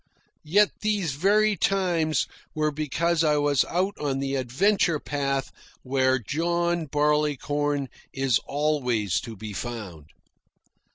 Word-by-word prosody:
Yet 205 Hz, +6 st, +4 dB
these 205 Hz, -6 st, 0 dB
very 205 Hz, +7 st, +3 dB
times 175 Hz, -5 st, +1 dB, 0.3 s
were 155 Hz, 0 st, +1 dB
because 155 Hz, +3 st, 0 dB
I 150 Hz, -1 st, +3 dB
was 145 Hz, -2 st, +3 dB
out 190 Hz, +4 st, -1 dB
on 140 Hz, -2 st, -1 dB
the 135 Hz, 0 st, -2 dB
adventure 160 Hz, -, +2 dB
path 140 Hz, -2 st, -2 dB, 0.3 s
where 130 Hz, 0 st, +2 dB
John 170 Hz, -, -1 dB
Barleycorn 145 Hz, -1 st, 0 dB, 0.2 s
is 135 Hz, -3 st, +1 dB
always 125 Hz, -, 0 dB
to 115 Hz, -2 st, -8 dB
be 105 Hz, +1 st, -7 dB
found. 100 Hz, -9 st, -6 dB
150 Hz, 115 wpm, -25 LUFS, 135-170 Hz, 0.3 s, Yet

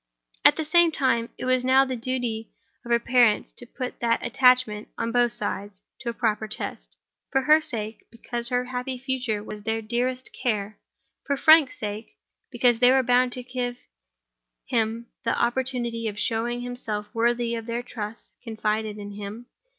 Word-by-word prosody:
At -, -, +7 dB
the 315 Hz, -, -2 dB
same 345 Hz, +2 st, +5 dB
time, 255 Hz, -6 st, +1 dB
it -, -, -5 dB
was 255 Hz, 0 st, +2 dB
now 260 Hz, +1 st, +5 dB
the 260 Hz, -1 st, -3 dB
duty 235 Hz, -3 st, -3 dB, 0.3 s
of 240 Hz, -, -10 dB
her 235 Hz, -, +5 dB
parents 235 Hz, -3 st, +3 dB
to 245 Hz, -, -8 dB
put 255 Hz, +1 st, -6 dB
that 230 Hz, -1 st, +1 dB
attachment, 250 Hz, -5 st, +3 dB
on 230 Hz, -, -2 dB
both 240 Hz, 0 st, +3 dB
sides, 205 Hz, -2 st, -4 dB, 0.2 s
to 240 Hz, -, -4 dB
a -, -, -3 dB
proper 220 Hz, -1 st, 0 dB
test—for 270 Hz, +4 st, -5 dB
her 305 Hz, +3 st, +6 dB
sake, 220 Hz, -8 st, -4 dB
because 235 Hz, +1 st, -4 dB
her 250 Hz, 0 st, 0 dB
happy 255 Hz, +1 st, -4 dB
future 250 Hz, -5 st, -2 dB
was 210 Hz, 0 st, -8 dB
their 225 Hz, +2 st, -1 dB
dearest 245 Hz, +3 st, -2 dB
care; 215 Hz, -4 st, -2 dB, 0.5 s
for 280 Hz, -1 st, +1 dB
Frank's 315 Hz, -3 st, +6 dB
sake, 210 Hz, +1 st, -6 dB, 0.3 s
because 240 Hz, -1 st, +2 dB
they 245 Hz, 0 st, +6 dB
were 265 Hz, 0 st, +4 dB
bound 250 Hz, 0 st, +3 dB
to 250 Hz, -, -6 dB
give 245 Hz, -1 st, -3 dB, 0.9 s
him 230 Hz, 0 st, -1 dB, 0.2 s
the 230 Hz, -, 0 dB
opportunity 240 Hz, -2 st, -1 dB
of 210 Hz, -1 st, -4 dB
showing 235 Hz, +2 st, -1 dB
himself 225 Hz, -4 st, -2 dB
worthy 235 Hz, 0 st, +1 dB
of 230 Hz, 0 st, -4 dB
the 235 Hz, +1 st, -2 dB
trust 220 Hz, -2 st, -7 dB
confided 220 Hz, -2 st, -2 dB
in 205 Hz, -1 st, -7 dB
him. 205 Hz, +3 st, -7 dB
240 Hz, 165 wpm, -25 LUFS, 220-255 Hz, 0.9 s, At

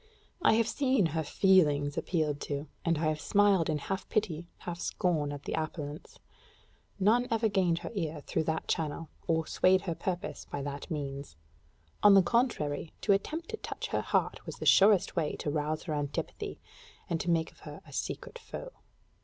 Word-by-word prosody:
I -, -, +5 dB
have 225 Hz, 0 st, +3 dB
seen 260 Hz, -7 st, +2 dB
her 160 Hz, -, +1 dB
feelings 150 Hz, -5 st, +3 dB
appealed 150 Hz, -4 st, -1 dB
to, 145 Hz, 0 st, -2 dB, 0.2 s
and 165 Hz, -1 st, +2 dB
I 155 Hz, -, -2 dB
have 155 Hz, 0 st, 0 dB
smiled 200 Hz, -5 st, +3 dB
in 155 Hz, -, +1 dB
half 195 Hz, +6 st, -4 dB
pity, 175 Hz, -6 st, -1 dB
half 175 Hz, -1 st, -5 dB
scorn 160 Hz, -6 st, 0 dB
at 145 Hz, 0 st, -7 dB
the -, -, -4 dB
appellants. 155 Hz, -1 st, -5 dB, 0.8 s
None 230 Hz, +6 st, +4 dB
ever 225 Hz, 0 st, +2 dB
gained 185 Hz, -5 st, +2 dB
her -, -, -4 dB
ear 160 Hz, -7 st, -3 dB
through 160 Hz, -, -1 dB
that 160 Hz, 0 st, -2 dB
channel, 160 Hz, 0 st, -2 dB, 0.2 s
or 160 Hz, -1 st, +1 dB
swayed 185 Hz, +3 st, +3 dB
her 175 Hz, -4 st, -2 dB
purpose 180 Hz, +1 st, -4 dB
by 140 Hz, -, -4 dB
that 140 Hz, +3 st, -5 dB
means. 140 Hz, -, -5 dB, 0.7 s
On 205 Hz, -1 st, +8 dB
the 195 Hz, -, +7 dB
contrary, 175 Hz, -, 0 dB
to 205 Hz, -, +4 dB
attempt 315 Hz, +12 st, -2 dB
to 440 Hz, -, -4 dB
touch -, -, -5 dB
her -, -, 0 dB
heart -, -, 0 dB
was -, -, -5 dB
the -, -, -6 dB
surest 200 Hz, -1 st, +5 dB
way 160 Hz, -4 st, 0 dB
to 145 Hz, -, -3 dB
rouse 155 Hz, +1 st, -1 dB
her 160 Hz, -, -3 dB
antipathy, 145 Hz, -1 st, -3 dB, 0.5 s
and 165 Hz, -1 st, -1 dB
to 175 Hz, -, -3 dB
make 165 Hz, -1 st, +1 dB
of -, -, -23 dB
her -, -, -10 dB
a -, -, -14 dB
secret -, -, -4 dB
foe. -, -, -8 dB
165 Hz, 185 wpm, -30 LUFS, 150-200 Hz, 0.8 s, On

